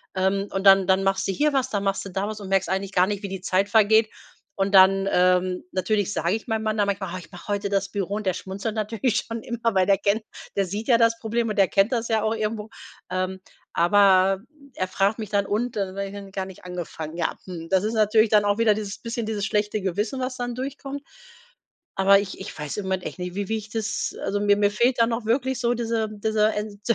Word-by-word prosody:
Ähm, 195 +1 0
und 195 +1 -3
dann 195 -1 +7
dann 190 0 +3
machst 195 0 +1
du - - +1
hier 295 +9 +1
was, 265 -2 +1
dann 205 -2 -2
machst 195 0 -1
du - - -6
da 195 +2 -2
was 215 0 -6
und 195 - -7
merkst 195 0 +2
eigentlich 190 +1 -2
gar 185 0 +4
nicht, 205 0 -3
wie 200 - -4
die 190 -1 -6
Zeit 190 +2 +1
vergeht. 220 +1 +4 0.5
Und 195 +1 -1
dann, 195 +1 +6
ähm, 180 0 +2
natürlich 200 +2 0
sage 170 +3 0
ich 220 - -7
meinem 220 -1 -1
Mann 215 -1 0
dann 205 - +3
manchmal: 195 -3 -2
„Oh, - - -3
ich 165 0 -14
mache 180 - -12
heute 200 0 -1
das 195 -1 0
Büro“, 200 0 -3
und 215 0 -4
der 185 - +2
schmunzelt 195 +3 -5
natürlich 220 +2 0
schon 230 -1 -5
immer, 235 -1 -1
weil 185 -1 +4
der 195 -1 +4
kennt 205 +3 0 0.3
der 195 - +2
sieht 205 +5 -5
ja 235 - +6
das 230 0 +3
Problem 230 +1 -1
und 210 - -2
der 195 -2 +4
kennt 200 +5 +3
das 230 -1 -1
ja 220 -2 +1
auch 220 +1 0
irgendwo, 215 0 -3 0.4
ähm. 185 0 -2 0.3
Aber 190 +1 +4 0.4
er 185 - -1
fragt 200 +4 +1
mich 215 -3 -5
dann: 200 -1 +1
„Und?“ 225 +5 -1
Da 195 -2 -2
sage 195 0 -4 0.2
ich: 195 - -17
„Gar 190 -1 -2
nicht 190 -1 -13
angefangen.“ 170 -3 -6
Ja, 170 - -1
hm, 165 -3 -8
das 190 0 +2
ist 220 - -1
natürlich 215 0 +3
dann 210 -1 +4
auch 205 0 +2
wieder 225 -2 +5
dieses 205 -1 -5
bisschen 230 -1 -4
dieses 210 -2 -2
schlechte 210 0 0
Gewissen, 205 +7 -2
was 255 0 -3
dann 245 -1 -3
durchkommt. 275 +2 -6 0.9
Aber 195 +1 +5
ich 200 -1 -6
ich 190 - -8
weiß 150 -2 -5
im 205 - -3
Moment 190 -1 -1
echt - - -6
nicht, 180 0 -5
wie 200 0 -3
wie 225 - 0
ich 210 0 -10
das 220 -1 -2
also, 205 - -1
mir 205 0 +4
mir 205 0 +3
fehlt 240 +4 +1
dann 230 0 +3
auch 230 0 -2
wirklich 260 +2 0
so 240 0 +1
diese 225 -2 -1
diese 215 0 +1
ent 210 -1 -5
205 Hz, 245 wpm, -24 LUFS, 190-220 Hz, 0.9 s, dann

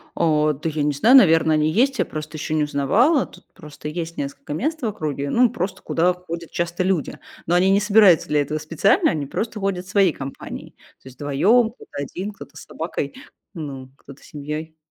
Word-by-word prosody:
О, 155 -2 +2
да 150 +3 -4
я 155 -1 -2
не 145 0 +1
знаю, 225 - +5
наверно, 165 -7 +5
они 155 0 +2
есть. 255 - +2
Я - - +2
просто 155 0 -7
ещё 155 - -4
не 155 - +2
узнавала. 200 - +2
Тут - - -17
просто 150 -1 -10
есть 165 +1 -5
несколько 140 +1 -5
мест 305 - -2
в - - -2
округе, 150 -9 -3
ну, 240 - +4
просто 185 +2 -4
куда 175 +2 +1
ходят 170 -2 -8
часто 175 +1 -2
люди. 185 -5 -1 0.3
Но 175 - +1
они 185 +2 +4
не 195 - +4
собираются 205 -4 +5
для 150 -1 +2
этого 150 +2 -2
специально, 165 +5 +2
они 150 -3 -3
просто 220 +9 -4
ходят 190 -2 -2
своей 190 -3 +3
компанией. 135 0 -8 0.3
То - - -15
есть 130 -1 -13
вдвоём, 200 - +3
кто-то 245 - -18
один, 190 +8 -5
кто-то 200 - -13
с - - -10
собакой, 160 -3 -4 0.4
ну 140 -6 -7
кто-то 140 0 -15
с - - -15
семьей. 150 +2 -6
165 Hz, 200 wpm, -22 LUFS, 150-195 Hz, 0.4 s, знаю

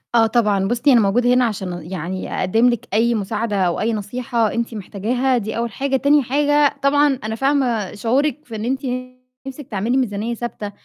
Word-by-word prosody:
آه 225 -1 +5
طبعًا، 210 -4 +1
بُصّي، 240 +6 +2
أنا 240 - +6
موجودة 245 +5 +2
هنا 250 0 +4
عشان 180 -6 -5
يعني 185 +1 -4
أقدِّم 225 +7 +3
لِك 240 -3 -3
أي 235 +2 +2
مساعدة 215 +1 -2
أو 180 -3 +1
أي 225 +1 0
نصيحة 230 +2 -1
أنتِ 235 0 -2
محتاجاها 240 +6 -1
دي 220 -1 -4
أول 235 -1 -2
حاجة، 270 +5 -1
تاني 285 +2 +3
حاجة 290 +3 +2
طبعًا 285 -1 +3
أنا 220 +1 -3
فاهمة 250 -6 0
شعورِك 280 +7 0
في 230 - -8
إن 215 +1 -4
أنتِ 265 +2 -1 0.7
نِفْسِك 270 0 -8
تعملي 220 +5 0
ميزانية 225 -2 -1
ثابتة 230 -3 -5
235 Hz, 185 wpm, -20 LUFS, 210-260 Hz, 0.7 s, أنا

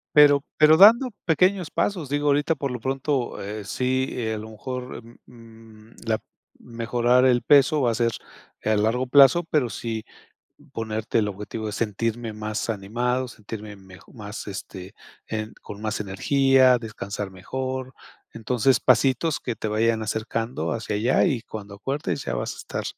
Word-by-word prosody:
Pero 145 -1 +7
pero 155 +1 +6
dando 230 +7 +7 0.2
pequeños 180 +2 +2
pasos. 180 -9 -1
Digo, 145 +1 0
ahorita 145 +3 +2
por 140 -2 -3
lo 125 - -4
pronto, 135 +1 -2
eh, 105 +1 -6
sí, 130 +4 0
eh, 110 -3 -2
a - - -5
lo 110 +1 -8
mejor, 125 +2 -7
mm 115 +1 -16
mm, 115 -2 -16
la 110 -1 +1
p - - -27 0.4
mejorar 120 +1 +1
el 125 -2 +4
peso, 145 +2 +5
va 120 -3 +2
a - - -2
ser 115 0 +1 0.5
a 110 - +2
largo 115 +5 +1
plazo. 140 +6 +6
Pero 140 -6 +1
sí, 110 -1 -4 0.7
ponerte 110 0 -2
el 105 - 0
objetivo, 105 +2 -6
de 105 - -3
sentirme 115 +2 -2
más 110 +1 -4
animado, 120 +5 -1
sentirme 105 -2 -9
mejo 95 -3 -16
más, 105 -1 -8
este, 95 -1 -8 0.3
en, 110 0 -4
con 105 0 -10
más 110 0 -2
energía, 130 +6 +3
descansar 105 -3 -6
mejor. 130 +7 -5 0.4
Entonces, 125 +3 +1
pasitos 135 +4 +2
que 120 - -3
te 110 - -4
vayan 110 +1 +1
acercando 115 +3 -3
hacia 110 -2 -3
allá, 115 +5 +2
y 135 -10 0
cuando 105 -3 -9
acuerdes, 135 +6 -3
ya 65 - -3
vas - - -3
a - - -14
estar, - - -5
115 Hz, 165 wpm, -24 LUFS, 110-130 Hz, 0.7 s, Pero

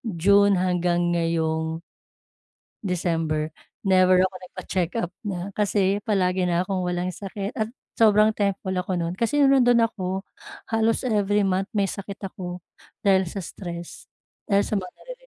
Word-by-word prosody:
June 200 0 +3
hanggang 175 -1 +1
ngayong 160 -1 -1 1.0
December 165 -5 -1 0.3
never 185 -1 +5
ako 190 0 -1
nagpa-check-up 185 +1 -3 0.2
na 185 0 -4
kasi 200 -1 +1
palagi 185 -3 +1
na 175 0 +1
akong 185 -1 -2
walang 180 +1 -1
sakit 195 +2 -5
at 215 - +1 0.3
sobrang 215 -1 +6
thankful 200 -2 -1
ako 180 +1 -2
no'n 170 +1 -2
kasi 270 +7 +1
no'ong 275 -1 +6
nandoon 245 -1 +5
ako 190 -5 -6 0.6
halos 225 0 +1
every 210 -4 +2
month 190 0 0
may 200 -2 +1
sakit 200 +1 -6
ako 180 -2 -6 0.4
dahil 190 -1 +3
sa 190 +3 -5
stress 170 -1 -8 0.4
dahil 200 -1 +3
sa - - -2
mga 185 - -3
naririnig - - -12
190 Hz, 140 wpm, -24 LUFS, 175-205 Hz, 1.0 s, sobrang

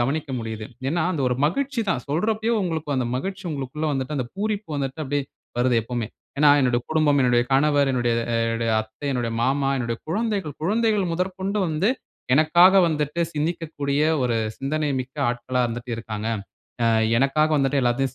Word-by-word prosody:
கவனிக்க 140 +4 -1
முடியுது. 110 -2 -5 0.2
ஏன்னா, 165 +3 0
அந்த 145 -5 -1
ஒரு 125 - 0
மகிழ்ச்சி 265 - -1
தான் 125 - -1
சொல்றப்பயே, 220 +8 0
உங்களுக்கு 160 -5 -2
அந்த 125 -2 0
மகிழ்ச்சி 190 +6 -4
உங்களுக்குள்ள 150 +2 -3
வந்துட்டு 135 +2 -2
அந்த 125 - -2
பூரிப்பு 210 -2 -2
வந்துட்டு 140 +2 -3
அப்டியே 140 0 -1 0.3
வருது 125 -1 +3
எப்போயுமே. 120 -1 -3 0.3
ஏன்னா, 150 0 +6
என்னோட 125 -2 +2
குடும்பம், 150 -3 +3
என்னுடைய 120 -1 +3
கணவர், 145 0 +3
என்னுடைய 120 -2 +1 0.4
என்னுடைய 115 0 -1
அத்தை, 110 +6 -9
என்னுடைய 120 -2 -1
மாமா, 135 +1 +1
என்னுடைய 115 -2 -2
குழந்தைகள் 200 - -2
குழந்தைகள், 210 -1 +2
முதற்கொண்டு 190 +3 -2
வந்து 165 +9 +1 0.4
எனக்காக 170 +5 +6
வந்துட்டு 150 +1 -1
சிந்திக்கக்கூடிய 150 -2 -2 0.2
ஒரு 120 -2 +1 0.2
சிந்தனை 150 +2 -1
மிக்க 130 +3 -9
ஆட்களா 125 +1 -1
இருந்துட்டு 120 +1 -6
இருக்காங்க. 110 -1 -4 0.6
அ - - +4 0.3
எனக்காக 155 +4 +3
வந்துட்டு 135 0 +2
எல்லாத்தயும் 130 +2 0
145 Hz, 155 wpm, -23 LUFS, 125-165 Hz, 0.6 s, ஏன்னா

